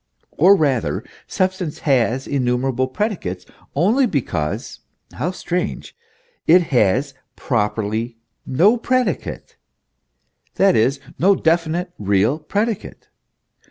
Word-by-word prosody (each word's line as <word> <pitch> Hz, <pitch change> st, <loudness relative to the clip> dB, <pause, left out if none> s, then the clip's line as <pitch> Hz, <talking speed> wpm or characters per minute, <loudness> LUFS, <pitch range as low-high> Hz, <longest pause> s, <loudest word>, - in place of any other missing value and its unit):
Or 185 Hz, +6 st, +5 dB
rather, 140 Hz, -, 0 dB, 0.2 s
substance 185 Hz, -4 st, -1 dB
has 130 Hz, -2 st, +1 dB
innumerable 130 Hz, -1 st, 0 dB
predicates 130 Hz, -, -3 dB, 0.3 s
only 220 Hz, -, +3 dB
because 80 Hz, -, -3 dB, 0.3 s
(how 160 Hz, -, -2 dB
strange!) 180 Hz, -1 st, -4 dB, 0.5 s
it 180 Hz, +2 st, +6 dB
has 125 Hz, +5 st, +2 dB, 0.2 s
properly 110 Hz, 0 st, -2 dB, 0.3 s
no 185 Hz, -, +3 dB
predicate; 255 Hz, +1 st, -2 dB, 1.0 s
that 195 Hz, -1 st, +4 dB
is, 130 Hz, +5 st, +2 dB, 0.2 s
no 195 Hz, +4 st, +5 dB
definite, 170 Hz, +1 st, 0 dB
real 105 Hz, +7 st, +1 dB
predicate. 210 Hz, +6 st, -3 dB
145 Hz, 90 wpm, -20 LUFS, 120-185 Hz, 1.0 s, it